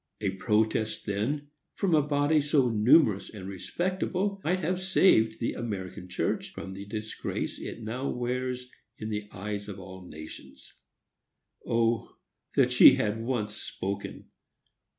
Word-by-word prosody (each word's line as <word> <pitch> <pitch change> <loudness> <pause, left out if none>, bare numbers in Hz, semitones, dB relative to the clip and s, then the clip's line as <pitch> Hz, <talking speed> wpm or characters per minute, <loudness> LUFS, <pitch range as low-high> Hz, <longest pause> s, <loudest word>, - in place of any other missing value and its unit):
A 100 -3 0
protest 110 +2 0
then, 130 +9 -1 0.3
from 190 -4 +1
a 155 - +6
body 145 +1 +2
so 145 -3 +3
numerous 110 - +4
and 95 -3 -8
respectable, 185 - -2
might 185 +3 +1
have 180 +3 -1
saved 115 -12 +4
the 115 - -1
American 95 -4 -5
church 90 - -1
from 95 - -7
the 100 +1 -8
disgrace 110 +1 -4
it 115 - -7
now 125 +5 -3
wears 125 +1 -2 0.3
in 110 - -5
the 105 -1 -3
eyes 105 +1 -5
of 100 -1 -7
all 95 0 -9
nations. 70 -4 -11 0.9
O 115 -1 +1 0.4
that 125 -2 +4
she 125 +1 +9
had 110 -4 -1
once 115 -4 -1
spoken! 100 -1 -5
115 Hz, 135 wpm, -29 LUFS, 100-140 Hz, 0.9 s, she